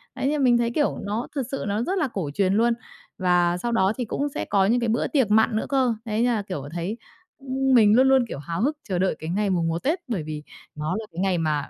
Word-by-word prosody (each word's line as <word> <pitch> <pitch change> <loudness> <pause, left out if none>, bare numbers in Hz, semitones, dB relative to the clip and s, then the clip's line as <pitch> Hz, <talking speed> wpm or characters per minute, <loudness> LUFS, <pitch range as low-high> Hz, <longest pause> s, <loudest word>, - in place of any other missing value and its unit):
đấy, - - -1
nên 295 0 +1
mình 240 -2 +5
thấy, 235 0 0
kiểu, 295 +2 0
nó 215 +4 -2
thực 275 - 0
sự 270 - -3
nó 205 +3 0
rất 380 +9 -1
là 300 - +1
cổ 175 -7 -3
truyền 190 +3 +1
luôn 230 +2 +3 0.4
và 175 -2 +2
sau 235 +6 -3
đó 190 -2 +2
thì 245 - -2
cũng 285 +6 -2
sẽ - - -4
có 195 -1 +2
những 235 +5 +2
cái 235 -2 -1
bữa 230 - +1
tiệc 260 -8 +1
mặn 220 +1 +4
nữa 220 - -1
cơ. 260 -4 +2
Đấy 220 +1 -1
nha 245 -1 +2
là, 215 - -1
kiểu, 185 -9 -6
thấy, 175 +6 -3 0.4
ưm, 270 0 0
mình 215 -3 +6
luôn 260 +2 +5
luôn, 265 -2 +4
kiểu, 140 - -6
háo 165 +5 -4
hức 295 +6 0
chờ 180 -2 0
đợi 185 -3 +1
cái 160 - -6
ngày 200 +3 0
mùng 175 -3 +1
một 165 +1 -2
Tết 320 +7 +1
bởi 210 -10 -2
vì 150 -1 -6 0.3
nó 150 +3 -2
là 220 - -6
cái 170 - -7
ngày 190 -2 +1
mà 155 -3 -1
215 Hz, 275 wpm, -24 LUFS, 180-250 Hz, 0.4 s, mình